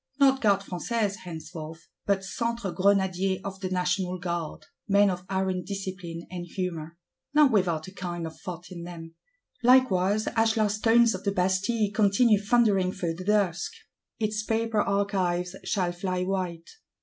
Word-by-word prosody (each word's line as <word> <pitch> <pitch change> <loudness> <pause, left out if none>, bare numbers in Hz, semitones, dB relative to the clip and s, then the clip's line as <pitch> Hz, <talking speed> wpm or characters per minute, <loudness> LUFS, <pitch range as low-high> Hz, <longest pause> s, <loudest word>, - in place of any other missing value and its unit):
Not 270 -1 +5
Gardes 200 -2 +3
Françaises 205 +3 -1
henceforth, 160 -1 -8 0.2
but 195 -1 +1
Centre 235 -1 -2
Grenadiers 190 -1 +2
of 195 -1 -6
the 190 -1 -3
National 180 0 0
Guard: 170 -3 -4 0.2
men 200 -1 +4
of 180 0 -6
iron 190 -1 -1
discipline 180 -4 -6
and 175 -1 -6
humour,—not 180 - -1
without 175 -6 +1
a 185 - -10
kind 175 -3 -4
of 160 0 -7
thought 180 0 -8
in 175 -2 -7
them! 165 -1 -9 0.5
Likewise 215 -5 +4
ashlar 225 -1 +3
stones 225 +2 +4
of - - -6
the 200 - +1
Bastille 195 +3 +1
continue 210 +1 +4
thundering 205 -4 +3
through 175 -3 -3
the 180 +2 -8
dusk; 205 - +1 0.4
its 215 -1 -1
paper 225 0 0
archives 190 -3 0
shall 180 -4 0
fly 180 0 -2
white. 180 -3 -3
190 Hz, 145 wpm, -27 LUFS, 175-210 Hz, 0.5 s, Not